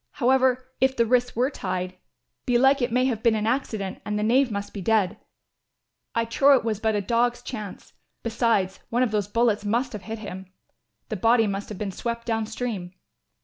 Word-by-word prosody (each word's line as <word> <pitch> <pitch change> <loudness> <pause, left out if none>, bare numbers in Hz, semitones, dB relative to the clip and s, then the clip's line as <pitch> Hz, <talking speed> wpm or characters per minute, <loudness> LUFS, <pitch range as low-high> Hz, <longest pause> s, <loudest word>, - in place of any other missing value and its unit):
However, 255 0 +2
if 265 +1 +3
the 235 - +4
wrists 245 +1 +1
were 255 +5 +1
tied, 185 -5 -3 0.5
belike 265 +3 +4
it 245 0 0
may 250 +2 +2
have 235 -5 -1
been 230 -1 +3
an 215 0 -1
accident 220 -5 -2
and 210 0 -2
the 210 - -1
knave 250 +4 +3
must 200 -1 -4
be 200 - -5
dead. 205 -1 +1 1.0
I 230 0 +2
trow 275 +4 +5
it 240 - -4
was 215 -3 -1
but 220 -1 +1
a 205 - +1
dog's 240 +3 +1
chance. 215 -7 -7 0.3
Besides, 225 -5 +1
one 240 +2 +2
of 245 - 0
those 205 -2 0
bullets 220 -1 +1
must 235 +5 0
have 210 - -6
hit 225 +2 -6
him. 190 -3 -8 0.6
The 215 - -3
body 225 +3 +4
must 200 0 -3
have 210 - -6
been 200 -1 -3
swept 235 +4 -4
down 225 -2 -1
stream." 220 -6 -4
225 Hz, 195 wpm, -25 LUFS, 205-245 Hz, 1.0 s, trow